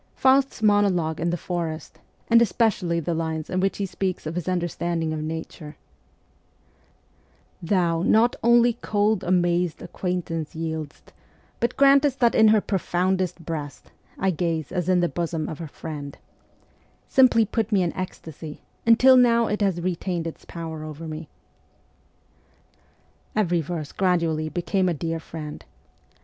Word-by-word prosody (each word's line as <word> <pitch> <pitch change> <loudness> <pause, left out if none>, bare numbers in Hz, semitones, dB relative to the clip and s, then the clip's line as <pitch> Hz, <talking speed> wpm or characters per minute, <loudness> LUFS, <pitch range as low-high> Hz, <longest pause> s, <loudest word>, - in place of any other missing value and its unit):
Faust's 265 -3 +2
monologue 190 -7 +2
in 170 +2 0
the 175 - -1
forest, 165 -3 -5 0.3
and 230 0 +6
especially 200 -6 +1
the 165 +1 -2
lines 160 -1 -3
in 185 - 0
which 195 +1 0
he 200 - -1
speaks 190 -2 -3
of 155 - -3
his 180 +1 -3
understanding 170 -2 -1
of 155 - -3
nature, 155 -1 -6 1.9
Thou 170 -2 +1
Not 225 +6 +3
only 235 0 +5
cold, 210 -1 +1
amazed 175 -1 +1
acquaintance 170 -4 -4
yield'st, 160 -2 -6 0.5
But 235 +1 -1
grantest 275 0 +5
that 235 -2 +4
in 220 - +6
her 215 -1 +5
profoundest 185 -2 -1
breast 150 -3 -6 0.3
I 190 0 +1
gaze, 165 -3 -2
as 180 -1 -2
in 180 -1 +3
the 175 - +2
bosom 165 -2 -3
of 155 - -6
a 165 - -5
friend, 145 -1 -8 0.9
simply 250 -4 +5
put 225 +1 -2
me 195 -3 +3
in 170 - -1
ecstasy, 160 -4 -7 0.2
and 230 0 +6
till 260 0 +7
now 235 -2 +5
it 210 -1 -2
has 190 -4 +1
retained 175 -1 -2
ts 165 - -7
power 160 -2 -6
over 155 +1 -7
me. 155 0 -7 2.1
Every 175 -5 +2
verse 155 -1 -5
gradually 165 -4 0
became 185 +2 0
a 170 - -1
dear 165 +2 -3
friend. 155 -2 -8
175 Hz, 145 wpm, -24 LUFS, 160-205 Hz, 2.1 s, till